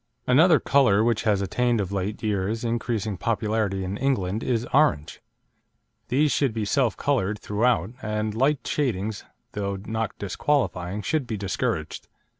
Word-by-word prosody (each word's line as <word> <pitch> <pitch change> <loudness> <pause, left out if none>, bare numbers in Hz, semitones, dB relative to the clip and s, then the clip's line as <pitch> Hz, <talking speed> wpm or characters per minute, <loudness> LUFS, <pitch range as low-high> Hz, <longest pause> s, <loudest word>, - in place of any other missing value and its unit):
Another 155 +4 +5
colour 120 -8 +3
which 115 -2 +1
has 100 -2 +2
attained 120 +4 +1
of 100 -2 -2
late 100 +3 -3
years 105 +2 -1
increasing 115 -3 -2
popularity 105 -2 -1
in 95 +2 -4
England 110 -7 0
is 120 -2 -1
orange. 140 - +2 0.9
These 145 +4 +2
should 135 -6 +1
be 110 -2 -1
self 125 0 +1
coloured 110 -8 0
throughout, 105 -3 0
and 105 0 -2
light 135 +5 +1
shadings, 110 -7 -2 0.3
though 100 -1 -3
not 110 0 -3
disqualifying, 100 -4 -1
should 155 -6 -1
be 110 - -3
discouraged. 100 -1 -3
110 Hz, 140 wpm, -25 LUFS, 100-125 Hz, 0.9 s, Another